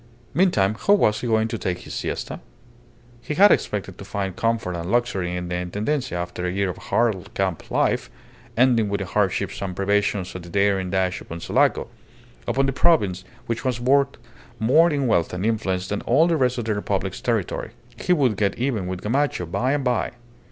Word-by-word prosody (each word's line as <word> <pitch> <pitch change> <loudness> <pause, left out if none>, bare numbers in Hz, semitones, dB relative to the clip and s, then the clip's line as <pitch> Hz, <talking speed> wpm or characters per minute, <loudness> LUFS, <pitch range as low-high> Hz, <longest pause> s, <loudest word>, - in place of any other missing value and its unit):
Meantime, 110 - +3
how 205 - +7
was 105 - +2
he 125 - -3
going 110 -1 +2
to 115 -1 -4
take 90 -1 -2
his - - -9
siesta? - - -4 0.8
He 150 - -4
had 205 +4 +7
expected 95 -3 -1
to - - -7
find 95 -2 -3
comfort 115 -5 0
and 85 0 -4
luxury 95 -7 0
in 90 0 -4
the 90 - -4
Intendencia 105 +7 -2
after 90 0 -4
a - - -1
year 95 0 0
of - - -11
hard 110 -6 0
camp 95 -4 -2
life, - - +1 0.5
ending 120 -4 +4
with 100 - -1
the - - -2
hardships 95 0 -1
and 95 -2 -3
privations 100 -1 0
of 90 - -6
the 85 - -11
daring 100 0 +1
dash 95 -1 0
upon 80 - -8
Sulaco - - +1 0.6
upon 135 +1 +2
the 135 - 0
province 100 - +2 0.2
which 115 -1 -3
was 125 -2 -1
worth 135 +2 +2 0.4
more 145 +10 +5
in 145 -3 0
wealth 90 -9 +1
and 90 +3 -2
influence 95 -5 0
than 105 +1 -2
all 140 +7 +4
the 170 -1 +2
rest 125 -4 +1
of 120 - -3
the 110 - 0
Republic's 105 - -2
territory. - - -1 0.3
He - - -1
would 135 - +3
get 100 -2 0
even 120 -7 -1
with 90 -1 -4
Gamacho 130 -4 0
by 125 +11 0
and 145 -2 0
by. 125 -2 0
105 Hz, 195 wpm, -23 LUFS, 95-125 Hz, 0.8 s, how